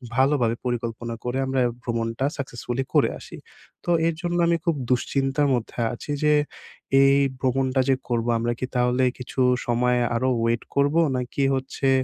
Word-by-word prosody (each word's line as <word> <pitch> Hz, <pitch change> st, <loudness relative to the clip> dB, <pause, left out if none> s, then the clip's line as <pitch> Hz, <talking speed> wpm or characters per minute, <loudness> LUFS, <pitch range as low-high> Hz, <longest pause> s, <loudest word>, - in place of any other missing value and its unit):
ভালোভাবে 130 Hz, -3 st, +2 dB
পরিকল্পনা 115 Hz, -1 st, -3 dB
করে 125 Hz, +1 st, -2 dB
আমরা 130 Hz, 0 st, 0 dB, 0.2 s
ভ্রমণটা 115 Hz, +1 st, -2 dB
সাকসেসফুলি 130 Hz, -1 st, -4 dB
করে -, -, +4 dB
আসি। -, -, -11 dB, 0.5 s
তো 175 Hz, -, -1 dB, 0.2 s
এর 165 Hz, -, +1 dB
জন্য 175 Hz, -1 st, -1 dB
আমি 170 Hz, 0 st, +3 dB
খুব 170 Hz, -2 st, +2 dB
দুশ্চিন্তার 135 Hz, +3 st, +1 dB
মধ্যে 120 Hz, -1 st, -3 dB
আছি 120 Hz, -, -7 dB
যে 150 Hz, 0 st, +4 dB, 0.7 s
এই 135 Hz, 0 st, +5 dB, 0.2 s
ভ্রমণটা 130 Hz, +1 st, +1 dB
যে 135 Hz, -, +5 dB
করব 115 Hz, -2 st, 0 dB
আমরা 120 Hz, +1 st, 0 dB
কি -, -, -1 dB
তাহলে 125 Hz, +1 st, +2 dB
কিছু 125 Hz, +1 st, -7 dB, 0.3 s
সময় 125 Hz, +1 st, +2 dB, 0.2 s
আরো 130 Hz, +3 st, +1 dB
ওয়েট 115 Hz, 0 st, +1 dB
করবো? 145 Hz, +3 st, +3 dB, 0.2 s
নাকি 125 Hz, +2 st, -2 dB
হচ্ছে 135 Hz, +1 st, -2 dB
130 Hz, 155 wpm, -24 LUFS, 120-135 Hz, 0.7 s, এই